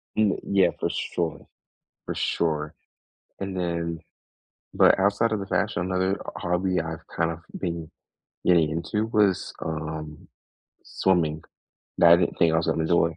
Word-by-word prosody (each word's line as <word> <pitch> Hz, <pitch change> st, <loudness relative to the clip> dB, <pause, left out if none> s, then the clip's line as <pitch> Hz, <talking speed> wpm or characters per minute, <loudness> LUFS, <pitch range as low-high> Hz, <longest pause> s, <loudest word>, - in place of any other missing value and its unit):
Y 110 Hz, -2 st, +3 dB, 0.2 s
yeah, 95 Hz, -3 st, +4 dB
for -, -, 0 dB
sure. 85 Hz, -2 st, -3 dB, 0.6 s
For -, -, -3 dB
sure. 75 Hz, -2 st, -1 dB, 0.7 s
And 95 Hz, -1 st, -4 dB
then 85 Hz, -2 st, -2 dB, 0.8 s
but, -, -, +5 dB
outside 100 Hz, +4 st, +2 dB
of 105 Hz, -, 0 dB
the 95 Hz, -, -5 dB
fashion, 90 Hz, -, 0 dB
another 95 Hz, +1 st, 0 dB
o -, -, -4 dB
hobby 90 Hz, 0 st, 0 dB
I've, 80 Hz, 0 st, -6 dB
kind 85 Hz, 0 st, +1 dB
of 85 Hz, -, -5 dB, 0.2 s
been 85 Hz, -3 st, -4 dB, 0.6 s
getting 85 Hz, -4 st, +4 dB
into 85 Hz, +7 st, -1 dB
was, 105 Hz, -4 st, +1 dB
um, 75 Hz, -1 st, -5 dB, 0.6 s
swimming. 80 Hz, -5 st, +1 dB, 0.6 s
That, 85 Hz, 0 st, +8 dB
I -, -, +9 dB
didn't 90 Hz, -, 0 dB
think 80 Hz, -1 st, +4 dB
I -, -, +3 dB
was 80 Hz, -, 0 dB
gonna 80 Hz, -, +1 dB
enjoy. 85 Hz, -1 st, +2 dB
85 Hz, 150 wpm, -25 LUFS, 80-95 Hz, 0.8 s, I